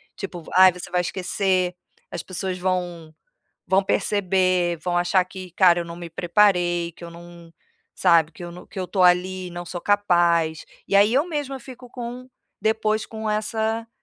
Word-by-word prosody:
Tipo: 180 Hz, -4 st, -7 dB
"Ai, 185 Hz, 0 st, +8 dB
você 180 Hz, 0 st, -8 dB
vai 180 Hz, 0 st, +1 dB
esquecer, 185 Hz, 0 st, -1 dB, 0.4 s
as -, -, -5 dB
pessoas 185 Hz, 0 st, -4 dB
vão 175 Hz, -3 st, -3 dB, 0.5 s
vão 190 Hz, +1 st, +2 dB
perceber, 185 Hz, -3 st, +1 dB
vão 175 Hz, +2 st, -2 dB
achar 175 Hz, +1 st, +2 dB
que, 185 Hz, 0 st, -10 dB
cara, 175 Hz, -1 st, +4 dB
eu 170 Hz, -, -4 dB
não 170 Hz, -, -8 dB
me 170 Hz, -1 st, -8 dB
preparei, 175 Hz, -1 st, +2 dB
que -, -, -14 dB
eu 170 Hz, -, -7 dB
não", 170 Hz, 0 st, -14 dB, 0.4 s
sabe, 170 Hz, -3 st, +4 dB
"que 175 Hz, -, -10 dB
eu 175 Hz, -, -7 dB
no 175 Hz, +1 st, -12 dB
que -, -, -14 dB
eu -, -, -1 dB
estou 185 Hz, 0 st, 0 dB
ali 180 Hz, +1 st, +2 dB
e -, -, -8 dB
não 175 Hz, 0 st, -7 dB
sou 175 Hz, 0 st, -6 dB
capaz", 170 Hz, -5 st, +2 dB, 0.2 s
e -, -, -4 dB
aí 205 Hz, +3 st, +5 dB
eu 280 Hz, +5 st, +3 dB
mesma 290 Hz, -5 st, -3 dB
fico 250 Hz, -1 st, -12 dB
com 245 Hz, +1 st, -7 dB, 0.3 s
depois 215 Hz, 0 st, 0 dB
com 220 Hz, -1 st, -5 dB
essa 220 Hz, +1 st, -1 dB
185 Hz, 180 wpm, -23 LUFS, 175-205 Hz, 0.5 s, Ai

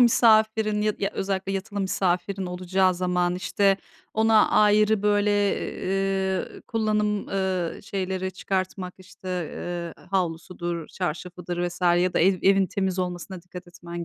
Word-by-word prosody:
misafirin 220 Hz, -3 st, +4 dB
ya 210 Hz, 0 st, 0 dB
d -, -, -1 dB
ya, -, -, 0 dB
özellikle 195 Hz, 0 st, -2 dB
yatılı 200 Hz, +1 st, -3 dB
misafirin 190 Hz, 0 st, 0 dB
olacağı 185 Hz, +1 st, +1 dB
zaman? 180 Hz, 0 st, 0 dB
İşte, 195 Hz, +1 st, +2 dB, 0.4 s
ona 220 Hz, 0 st, +4 dB
ayrı, 210 Hz, 0 st, +4 dB
böyle, 205 Hz, 0 st, +3 dB, 0.5 s
eee, 190 Hz, 0 st, -1 dB
kullanım, 210 Hz, -2 st, 0 dB
ııı, 190 Hz, -3 st, -1 dB
şeyleri 190 Hz, -2 st, -3 dB
çıkartmak, 185 Hz, -1 st, -3 dB
işte, 185 Hz, 0 st, -12 dB
eee, 175 Hz, -1 st, -5 dB
havlusudur, 175 Hz, -2 st, -2 dB
çarşafıdır 175 Hz, 0 st, -3 dB
vs. 175 Hz, -, -11 dB
ya 175 Hz, 0 st, +3 dB
da -, -, +3 dB
ev 185 Hz, +2 st, +4 dB
evin 195 Hz, 0 st, +4 dB
temiz 190 Hz, -1 st, -2 dB
olmasına 180 Hz, 0 st, -4 dB
dikkat 180 Hz, 0 st, -10 dB
etmen 175 Hz, 0 st, -7 dB
190 Hz, 130 wpm, -25 LUFS, 180-200 Hz, 0.5 s, misafirin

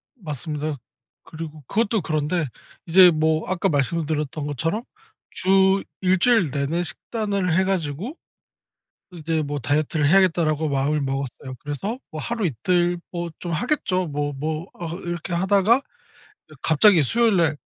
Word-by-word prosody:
맞습니다. 150 Hz, -, -4 dB, 0.5 s
그리고 155 Hz, -1 st, -8 dB
그것도 220 Hz, -1 st, +1 dB
그런데 155 Hz, +1 st, -1 dB, 0.4 s
이제 180 Hz, +1 st, +7 dB
뭐 155 Hz, 0 st, +1 dB
아까 185 Hz, +1 st, +1 dB
말씀을 150 Hz, +2 st, 0 dB
드렸던 150 Hz, -1 st, -3 dB
것처럼 165 Hz, -, -2 dB, 0.5 s
주 190 Hz, +1 st, +3 dB, 0.2 s
1 185 Hz, 0 st, +3 dB
주일 220 Hz, -, +3 dB
내내 150 Hz, +5 st, -1 dB
식단을 200 Hz, -3 st, -2 dB
해 190 Hz, -, +4 dB
가지고 185 Hz, -, -2 dB, 1.0 s
이제 160 Hz, -2 st, -2 dB
뭐 145 Hz, -1 st, -3 dB
'다이어트를 145 Hz, +3 st, 0 dB
해야겠다.'라고 165 Hz, -4 st, +3 dB
마음을 140 Hz, +2 st, +1 dB
먹었어요. 135 Hz, -1 st, -4 dB
그래서 195 Hz, -, -3 dB
뭐 155 Hz, -2 st, -5 dB
하루, 230 Hz, -, -2 dB
이틀 175 Hz, +6 st, +1 dB
뭐 170 Hz, -1 st, -4 dB
좀 175 Hz, -, -5 dB
하겠죠. 185 Hz, -, 0 dB
뭐 145 Hz, 0 st, -2 dB
뭐 155 Hz, +5 st, -3 dB
어 170 Hz, -, -6 dB
이렇게 175 Hz, 0 st, -4 dB
하다가 200 Hz, +7 st, +3 dB, 0.8 s
갑자기 175 Hz, +5 st, +5 dB
이어 155 Hz, -, +5 dB
수요일날 175 Hz, -, +2 dB
165 Hz, 310 characters per minute, -23 LUFS, 150-190 Hz, 1.0 s, 이제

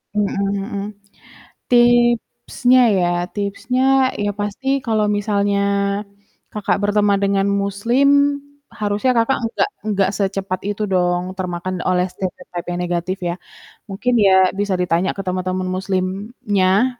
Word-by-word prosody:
Mmm, 210 Hz, -1 st, +2 dB, 0.3 s
mhm, 200 Hz, 0 st, -4 dB, 0.9 s
tipsnya 240 Hz, +1 st, +3 dB, 0.2 s
ya 175 Hz, -1 st, +2 dB, 0.3 s
tipsnya 205 Hz, +5 st, -2 dB, 0.4 s
ya, 205 Hz, -, 0 dB
pasti 205 Hz, +6 st, -4 dB, 0.2 s
kalau 220 Hz, -2 st, +1 dB
misalnya 200 Hz, -1 st, 0 dB, 0.9 s
Kakak 210 Hz, -2 st, -1 dB
berteman 205 Hz, 0 st, +2 dB
dengan 195 Hz, 0 st, +1 dB
muslim, 200 Hz, +7 st, +1 dB, 0.7 s
harusnya 210 Hz, +4 st, +1 dB
Kakak 230 Hz, +4 st, +2 dB
enggak 230 Hz, -, 0 dB, 0.2 s
enggak 200 Hz, -2 st, +1 dB
secepat 195 Hz, -2 st, -2 dB
itu 205 Hz, +1 st, -2 dB
dong 175 Hz, -1 st, +1 dB
termakan 185 Hz, 0 st, -4 dB
oleh 180 Hz, 0 st, +2 dB
stereotipe 185 Hz, -2 st, -6 dB
yang 175 Hz, -, -3 dB
negatif, 175 Hz, +2 st, -2 dB
ya. 175 Hz, 0 st, -1 dB, 0.5 s
Mungkin, 225 Hz, +6 st, -1 dB
ya, 190 Hz, -2 st, +5 dB
bisa 205 Hz, -1 st, 0 dB
ditanya 180 Hz, 0 st, 0 dB
ke 195 Hz, -, -4 dB
teman-teman 185 Hz, 0 st, -2 dB
muslimnya, 195 Hz, +4 st, 0 dB
200 Hz, 115 wpm, -19 LUFS, 185-215 Hz, 0.9 s, ya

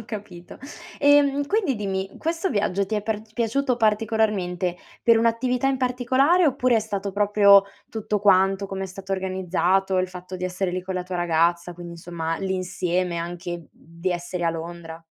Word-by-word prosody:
ho -, -, -10 dB
capito. 200 Hz, -6 st, -9 dB, 0.4 s
Ehm, 285 Hz, -1 st, +4 dB
quindi 385 Hz, -, +1 dB
dimmi, 195 Hz, -2 st, -3 dB
questo 330 Hz, +3 st, -1 dB
viaggio 200 Hz, -1 st, 0 dB
ti 215 Hz, -, -3 dB
è 210 Hz, -, -1 dB
par 215 Hz, -1 st, -2 dB
piaciuto 250 Hz, +2 st, 0 dB
particolarmente 210 Hz, -5 st, 0 dB, 0.3 s
per 230 Hz, -1 st, +5 dB
un'attività 240 Hz, +3 st, +1 dB
in 270 Hz, -, +2 dB
particolare 260 Hz, +7 st, +2 dB
oppure 255 Hz, -3 st, +2 dB
è -, -, +4 dB
stato 200 Hz, -2 st, -4 dB
proprio 200 Hz, 0 st, +5 dB, 0.2 s
tutto 215 Hz, -2 st, -2 dB
quanto, 195 Hz, 0 st, +3 dB
come 195 Hz, 0 st, -4 dB
è -, -, -4 dB
stato 190 Hz, +1 st, -10 dB
organizzato, 190 Hz, 0 st, 0 dB
il 185 Hz, 0 st, 0 dB
fatto 180 Hz, 0 st, -8 dB
di 180 Hz, -, -5 dB
essere 185 Hz, +1 st, -2 dB
lì 185 Hz, +1 st, -3 dB
con 185 Hz, +1 st, -5 dB
la 180 Hz, -, -2 dB
tua 180 Hz, 0 st, -5 dB
ragazza, 170 Hz, +1 st, +1 dB
quindi 175 Hz, 0 st, -9 dB
insomma 165 Hz, -1 st, -4 dB
l'insieme 185 Hz, -2 st, -1 dB
anche 170 Hz, 0 st, -5 dB
di 170 Hz, +3 st, -6 dB
essere 175 Hz, 0 st, -4 dB
a 165 Hz, -, +3 dB
Londra? 165 Hz, 0 st, -7 dB
195 Hz, 170 wpm, -24 LUFS, 180-225 Hz, 0.4 s, per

